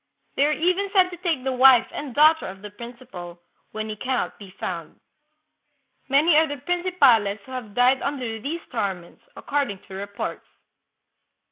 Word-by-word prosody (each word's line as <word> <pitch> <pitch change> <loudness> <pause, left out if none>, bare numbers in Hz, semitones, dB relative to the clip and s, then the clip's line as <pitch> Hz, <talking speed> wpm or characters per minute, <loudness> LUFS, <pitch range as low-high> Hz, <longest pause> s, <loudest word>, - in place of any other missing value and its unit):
They 280 - +3
are - - +1
even 365 +6 +1
said 370 -3 +4
to 350 - -8
take 330 -7 -1
the 265 - -1
wife 255 -1 +6
and 285 -4 -6
daughter 310 +2 +5
of 190 +1 -10
the 210 - -8
principal, 235 -7 -10 0.3
when 215 0 -4
he 215 - -5
can 255 +5 -2
not - - -3
be 200 -2 -11
found. 170 -3 -5 1.1
Many 300 +4 +4
are 320 +1 +5
the 290 0 -5
prin 355 +6 -2
cipales 240 - +3
who 260 - -13
have 235 -6 -7
died 250 +2 +4
under 250 -6 -3
these 320 +7 -4
torments, 195 -7 -4
according 280 -8 -2
to 190 - -11
reports." 200 +1 -6
255 Hz, 170 wpm, -24 LUFS, 210-305 Hz, 1.1 s, wife